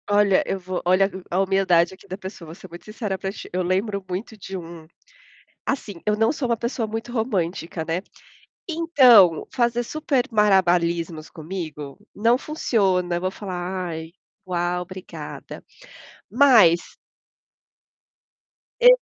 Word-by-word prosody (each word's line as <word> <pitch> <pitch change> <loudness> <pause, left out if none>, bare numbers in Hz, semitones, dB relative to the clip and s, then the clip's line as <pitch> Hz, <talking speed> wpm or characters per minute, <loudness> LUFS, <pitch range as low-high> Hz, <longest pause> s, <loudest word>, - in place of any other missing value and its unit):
Olha, 205 -2 +4
eu 195 - -2
vou 185 0 -4
olha 185 +2 +4 0.2
a 180 - 0
humildade 190 -3 +2
aqui 190 - -17
da 185 0 -6
pessoa, 190 -3 -9
vou 160 - -9
ser 190 - -12
muito 170 +1 -12
sincera 215 -2 -4
para 190 0 -4
ti, 200 - -10
eu 185 - 0
lembro 195 +2 -1
muito 195 +5 -5
de 195 -1 -7
um, 165 -2 -10 0.8
assim, 240 -7 -3
eu 210 0 +1
não 225 +1 +2
sou 280 -4 -3
uma 235 - +1
pessoa 235 0 -2
muito 225 +2 -5
romântica, 180 -8 -2
né. 165 +3 -2 0.7
Então, 255 - +5
fazer 240 -1 +1
super 280 -1 0
malabarismos 175 -6 +2
comigo, 155 -4 -7 0.2
não 230 +4 +3
funciona, 195 - 0
eu 175 - -2
vou 185 0 -1
falar: 185 -2 -4
"Ai, 160 0 -6 0.4
uau 175 0 -1
obrigada". 185 +1 -9 0.7
Mas 215 -12 +5 1.8
E - - +8
190 Hz, 140 wpm, -23 LUFS, 175-225 Hz, 1.8 s, E